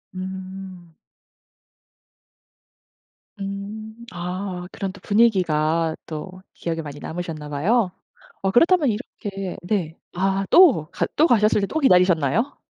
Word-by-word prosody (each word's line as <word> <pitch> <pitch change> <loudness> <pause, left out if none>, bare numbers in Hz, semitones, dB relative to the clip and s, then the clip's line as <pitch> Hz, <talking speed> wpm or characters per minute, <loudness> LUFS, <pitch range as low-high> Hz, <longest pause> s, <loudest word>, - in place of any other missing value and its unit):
음. 185 -2 -7 2.5
음. 200 +3 -6 0.2
아 180 +1 -4
그런 195 -1 -4
또 195 - -14
분위기가 165 -7 +2
또 185 +4 -7
기억에 165 -1 -3
많이 145 -1 -8
남으셨나 160 -3 -6
봐요. 185 +7 +1 0.5
어 195 0 +1
그렇다면 330 - +4
이렇게 200 -4 -5
네 175 -4 -2 0.2
아 195 +1 +1
또 270 - +6
가 - - -1
또 315 +3 +5
가셨을 215 -3 +4
때 195 - 0
또 315 - -2
기다리셨나요? 180 - +3
190 Hz, 215 characters per minute, -23 LUFS, 170-210 Hz, 2.5 s, 또